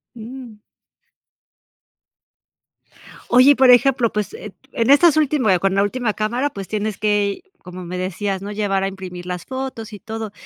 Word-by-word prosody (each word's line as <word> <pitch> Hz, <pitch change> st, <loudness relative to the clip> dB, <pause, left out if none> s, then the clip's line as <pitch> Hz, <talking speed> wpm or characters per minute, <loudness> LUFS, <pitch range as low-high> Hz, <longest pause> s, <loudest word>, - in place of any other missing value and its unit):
Mm. 235 Hz, -1 st, -10 dB, 2.7 s
Oye, 255 Hz, +3 st, +6 dB
y, -, -, +4 dB
por 260 Hz, -1 st, +6 dB
ejemplo, 245 Hz, -2 st, +4 dB
pues, 210 Hz, -2 st, -3 dB
eh, 215 Hz, -, -9 dB, 0.2 s
p -, -, -4 dB
en 230 Hz, -, +2 dB
estas 305 Hz, +2 st, +6 dB
última 270 Hz, -10 st, +2 dB
con 195 Hz, +1 st, 0 dB
la 200 Hz, -, +3 dB
última 220 Hz, +1 st, -1 dB
cámara, 240 Hz, +7 st, -1 dB
pues, 195 Hz, -7 st, -8 dB
tienes 215 Hz, -1 st, -3 dB
que, 205 Hz, -1 st, 0 dB, 0.2 s
como 180 Hz, 0 st, -10 dB
me 180 Hz, +1 st, -5 dB
decías, 190 Hz, +1 st, -3 dB
¿no?, 200 Hz, +1 st, -6 dB
llevar 200 Hz, -2 st, -1 dB
a -, -, 0 dB
imprimir 185 Hz, -2 st, -8 dB
las 180 Hz, -2 st, -5 dB
fotos 260 Hz, -4 st, -6 dB
y 205 Hz, -, -9 dB
todo. 220 Hz, 0 st, -6 dB
215 Hz, 165 wpm, -20 LUFS, 195-250 Hz, 2.7 s, Oye